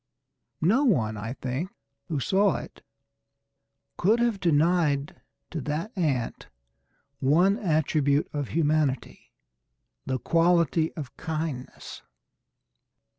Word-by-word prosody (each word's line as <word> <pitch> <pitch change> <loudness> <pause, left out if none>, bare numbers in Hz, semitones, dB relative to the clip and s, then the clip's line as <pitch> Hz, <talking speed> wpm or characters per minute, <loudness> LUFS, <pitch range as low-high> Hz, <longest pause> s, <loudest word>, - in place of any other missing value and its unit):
No 220 - +3
one, 120 - +2
I 110 +3 -5
think, 135 +7 -4 0.4
who 155 -6 -2
saw 195 +9 +2
it - - -8 1.2
could 215 +6 +3
have 235 -4 +1
denied 160 -3 +1 0.3
to 165 - -3
that 155 - -4
ant 140 - -1 0.7
one 175 +9 +4
attribute 155 - +1
of 145 -3 -2
humanity, 150 -5 -1 0.8
the 130 -1 0
quality 165 +1 +2
of 140 -4 -8
kindness. 155 -5 -5
155 Hz, 95 wpm, -26 LUFS, 140-175 Hz, 1.2 s, one